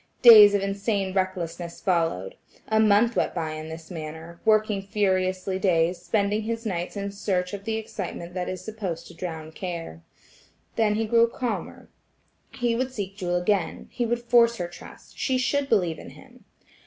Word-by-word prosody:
Days 210 -4 +10
of 200 - +1
insane 195 -1 -1
recklessness 180 -3 -3
followed. 165 - 0 0.3
A 220 0 +2
month 220 +2 +4
went - - 0
by 160 -2 -2
in 155 0 -6
this 160 +2 -9
manner–working 170 +6 -1
furiously 190 -2 0
days, 175 -2 +2
spending 200 +4 0
his 230 +1 -4
nights 180 -1 -3
in 200 0 -3
search 190 -2 -2
of 200 0 -6
the 225 - -1
excitement 180 -5 -6
that 180 -1 -3
is 185 - -6
supposed 195 -7 -5
to - - -12
drown 160 -2 -6
care. 165 - -6 0.7
Then 215 -2 +2
he 225 +1 0
grew 230 +1 +4
calmer. 245 +1 -4 0.7
He 240 -2 +1
would 255 +2 -1
seek 200 -6 -5
Jewel 180 -3 -2
again; 180 0 -1
he 240 - -1
would 240 +1 -1
force 235 -1 +4
her 175 -6 -3
trust; 175 - -14
she 260 -2 +1
should 275 +2 0
believe 175 -7 +1
in - - -10
him. - - -17
195 Hz, 165 wpm, -25 LUFS, 175-220 Hz, 0.7 s, Days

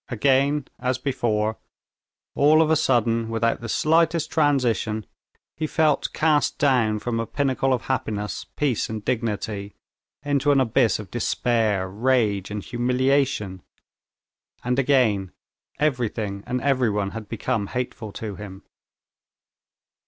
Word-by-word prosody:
Again, 135 +3 +2
as 125 0 0
before, 110 -5 -1 0.7
all 155 +3 +5
of 155 - 0
a - - +5
sudden, 115 -5 +1
without 115 0 0
the 115 - -6
slightest 160 +3 +2
transition, 125 -8 +1 0.5
he 155 +1 -2
felt 155 -2 +1
cast 155 -2 +1
down 125 -7 +2
from 115 +1 -2
a 115 - -2
pinnacle 135 0 0
of 130 - 0
happiness, 105 -5 -3
peace, 140 -6 0
and 110 -2 -5
dignity, 105 -3 -2 0.5
into 145 0 +2
an 140 - +4
abyss 125 -2 +2
of 105 -2 -10
despair, 110 -4 0
rage, 105 -2 +1
and 105 -1 -5
humiliation. 125 -5 0 1.0
Again 125 -7 +2 0.4
everything 115 -8 -1
and 125 0 -2
everyone 115 -8 +1
had 110 -1 -8
become 115 -2 -2
hateful 120 -3 -4
to 105 -3 -6
him. 100 -2 -9
120 Hz, 120 wpm, -24 LUFS, 105-135 Hz, 1.0 s, all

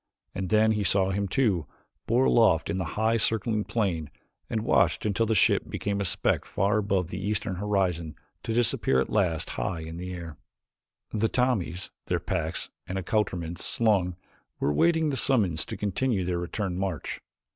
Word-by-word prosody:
And 95 -2 -3
then 110 0 +4
he 105 -1 0
saw 95 +1 +4
him 100 +1 -1
too 95 - +1 0.4
borne 125 +3 +3
aloft 95 -9 +4
in 95 - -1
the 85 -5 -4
high 110 +1 +2
circling 110 0 +1
plane 90 -11 -1 0.4
and 110 - -1
watched - - +3
until 110 +2 +1
the 110 - +1
ship - - +3
became 100 0 -2
a - - -1
speck 90 - +1
far 105 +2 +1
above 95 -4 0
the 90 - -4
eastern 100 -2 -1
horizon 90 -6 -1 0.3
to 115 - -4
disappear 110 - +2
at 65 - -1
last 90 -7 0
high 80 +7 -2
in 80 +2 -7
air. 85 -4 -6 0.7
The 110 0 +1
Tommies, 105 -9 0 0.2
their - - 0
packs 80 +1 -2 0.2
and 95 - -3
accouterments 90 -4 -1
slung, 100 -6 +1 0.4
were 75 - +1
waiting 160 - +3
the 135 - -1
summons 100 - +2
to - - -6
continue 105 0 0
their 90 -1 -1
return 90 +1 -3
march. 95 -5 -3
100 Hz, 170 wpm, -27 LUFS, 85-110 Hz, 0.7 s, then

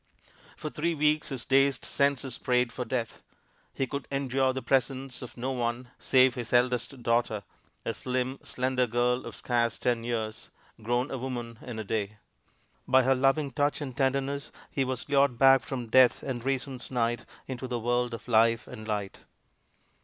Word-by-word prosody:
For 155 - -5
three 165 +5 -1
weeks 150 0 +2
his 135 -4 -4
dazed 135 0 +3
senses 140 -3 0
prayed 125 -1 +1
for 125 - -4
death. 120 -2 -3 0.5
He 135 - -1
could 140 +1 -5
endure 135 -1 +1
the 130 0 -4
presence 135 0 0
of 125 - -9
no 130 +3 -2
one 125 0 -2
save 130 -1 +4
his 120 -2 -5
eldest 125 +1 +1
daughter, 115 -3 +1 0.4
a - - -1
slim, 130 +1 -2
slender 130 0 0
girl 120 +2 +1
of - - -8
scarce 115 -2 0
ten 120 -2 0
years, 110 -2 -3 0.3
grown 120 +4 0
a 135 - -3
woman 120 -3 -5
in 120 -3 -7
a 110 - -3
day. 105 0 -2 0.7
By 130 0 +5
her 135 +2 +4
loving 135 +2 +2
touch 145 +2 +1
and 135 -4 -5
tenderness 140 +1 0 0.2
he 135 - +1
was 130 -1 -3
lured 140 -3 +3
back 135 0 +7
from 125 -1 -4
death 125 +2 +5
and 125 -4 -4
reason's 135 -1 -3
night 120 -2 0 0.2
into 130 0 -5
the 125 -1 -2
world 120 +1 0
of 115 - -12
life 115 0 +4
and 110 0 -9
light. 105 -2 -3
125 Hz, 170 wpm, -28 LUFS, 120-135 Hz, 0.7 s, back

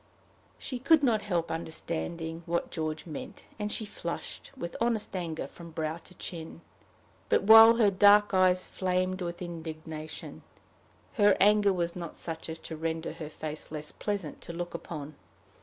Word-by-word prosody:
She 255 - -5
could 300 +3 +5
not 225 -5 +3
help 175 -5 -1
understanding 165 0 -4
what 170 +1 -1
George 155 -1 -3
meant, 155 -4 -8
and 210 0 -2
she 220 - -1
flushed, 210 - -6
with 170 -8 -5
honest 230 -4 0
anger, 165 -3 -3
from 170 -1 -11
brow 160 0 -3
to 180 +2 -15
chin. 165 -1 -7 0.7
But, - - +3
while 225 +2 +10
her 220 -4 +4
dark 205 +2 +6
blue 190 - +2
eyes 185 0 +4
flamed 185 0 -1
with 175 0 -4
indignation, 160 -2 -7 0.8
her 205 -2 +5
anger 205 0 +5
was 170 -2 -1
not 170 -3 -6
such 165 -1 -5
as 160 - -3
to 160 - -5
render 160 +1 -3
her 155 -2 -7
face 155 0 -5
less 150 -1 -4
pleasant 200 -8 -4
to 170 - -8
look 175 +1 -5
upon. 150 -2 -6
170 Hz, 160 wpm, -29 LUFS, 160-205 Hz, 0.8 s, while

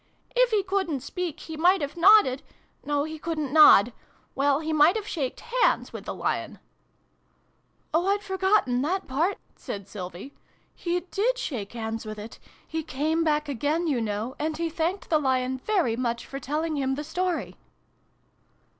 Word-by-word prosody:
" - - -43
If - - +4
he 425 -4 +2
couldn't 375 -8 -1
speak, 340 +3 -5
he 320 - -7
might 360 +5 +4
have 285 0 -4
nodded 345 -7 +6 0.4
no, 290 -1 0
he 315 +1 -6
couldn't 310 -4 -3
nod. 245 -7 +8 0.4
Well, 280 +1 +2
he 315 0 -3
might 310 +5 +5
have 430 -2 -3
shaked 275 -7 -3
hands - - +1
with - - -7
the - - -4
Lion! - - -2 0.6
" - - -42
<( - - -42
Oh, 340 +4 +2
I'd 405 +1 +1
forgotten 380 -10 +1
that 365 +7 -1
part!" 315 +9 0 0.2
said 200 -1 -7
Sylvie. 185 +6 -8 0.2
" - - -39
He 350 0 0
did 415 +8 -1
shake 230 - -4
hands 225 -1 -4
with 215 0 -6
it. 215 +2 -9 0.3
He 320 0 -3
came 310 +4 -1
back 300 -1 +1
again, 295 +5 -1
you 275 -7 0
know, 220 +4 -3
and 310 +1 -2
he 335 0 -2
thanked 340 +5 -2
the 310 - +4
Lion 260 -2 0
very 340 - +1
much, 235 -1 -2
for 275 - -7
telling 305 +2 -2
him 270 -1 0
the 295 - -4
story." 360 +3 -2
310 Hz, 180 wpm, -26 LUFS, 260-355 Hz, 0.6 s, nod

